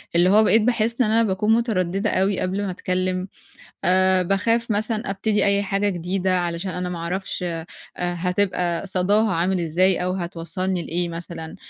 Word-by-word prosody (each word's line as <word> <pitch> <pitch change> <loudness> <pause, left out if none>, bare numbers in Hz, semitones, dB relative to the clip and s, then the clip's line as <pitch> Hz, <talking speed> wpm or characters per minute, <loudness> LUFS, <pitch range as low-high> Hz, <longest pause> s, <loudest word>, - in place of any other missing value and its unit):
اللي 175 +2 +4
هو 210 +3 +6
بقيت 220 +1 +4
باحس 235 +1 +2
إن - - +4
أنا 230 +1 +4
باكون 210 +1 +1
مُتَرددة 205 -3 0
أوي 190 0 +1
قبل 190 +2 -1
ما 190 - -2
اتكلّم، 185 0 -2 0.6
آآ 185 0 +4
باخاف 230 +6 0
مثلًا 215 +1 0
أبتدي 205 +2 0
أي 200 0 +2
حاجة 200 +1 0
جديدة 185 0 -1
علشان 175 +2 -3
أنا 180 +1 -3
ما 180 -1 -5
أعرفش 180 +3 -4
آآ، 165 -2 -4 0.3
هتبقى 180 0 -1
صَدَاها 200 +3 +2
عامل 180 +2 0
إزاي 175 +3 +2
أو 180 - 0
هتوصّلني 180 0 -3
لإيه 175 +1 -2
مثلًا، 165 -1 -7
185 Hz, 165 wpm, -22 LUFS, 175-205 Hz, 0.6 s, هو